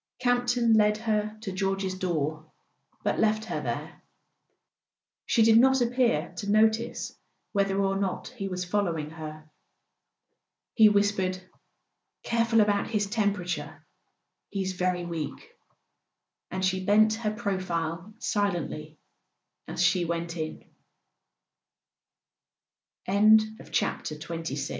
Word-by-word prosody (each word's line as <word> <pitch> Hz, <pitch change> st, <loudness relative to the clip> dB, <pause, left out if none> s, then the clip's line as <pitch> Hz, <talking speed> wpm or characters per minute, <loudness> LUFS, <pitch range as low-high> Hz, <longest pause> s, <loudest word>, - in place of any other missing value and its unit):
Camp 245 Hz, 0 st, +1 dB
ton 240 Hz, -2 st, +3 dB
led 210 Hz, -1 st, +4 dB
her 215 Hz, -1 st, -1 dB
to 200 Hz, -, -4 dB
George's 195 Hz, 0 st, -1 dB
door, 155 Hz, -4 st, -2 dB, 0.5 s
but -, -, 0 dB
left 215 Hz, 0 st, +2 dB
her -, -, -3 dB
there; -, -, -5 dB, 1.3 s
she 230 Hz, -, +4 dB
did 225 Hz, 0 st, +7 dB
not 265 Hz, +2 st, +5 dB
appear 235 Hz, -9 st, +1 dB
to 200 Hz, -, -4 dB
notice 220 Hz, +2 st, +2 dB, 0.4 s
whether 195 Hz, -1 st, +1 dB
or 195 Hz, 0 st, +1 dB
not 195 Hz, -1 st, -2 dB
he 225 Hz, -6 st, -5 dB
was 180 Hz, -1 st, -3 dB
following 175 Hz, -6 st, -1 dB
her. 155 Hz, -1 st, -8 dB, 1.3 s
He 220 Hz, -2 st, +7 dB
whispered: 200 Hz, -3 st, +1 dB, 0.8 s
"Careful 230 Hz, -1 st, +3 dB
about 205 Hz, -1 st, +2 dB
his 210 Hz, -2 st, 0 dB
tem¬ 205 Hz, 0 st, +1 dB
perature; 180 Hz, -3 st, -5 dB, 0.7 s
he's 190 Hz, -2 st, -2 dB
very 180 Hz, -1 st, -1 dB
weak," 165 Hz, -3 st, -5 dB, 1.0 s
and 190 Hz, 0 st, -2 dB
she 185 Hz, 0 st, 0 dB
bent 215 Hz, +2 st, +4 dB
her 220 Hz, -1 st, -2 dB
profile 185 Hz, -4 st, -3 dB
silent 205 Hz, -8 st, -1 dB
200 Hz, 95 wpm, -27 LUFS, 185-220 Hz, 1.3 s, did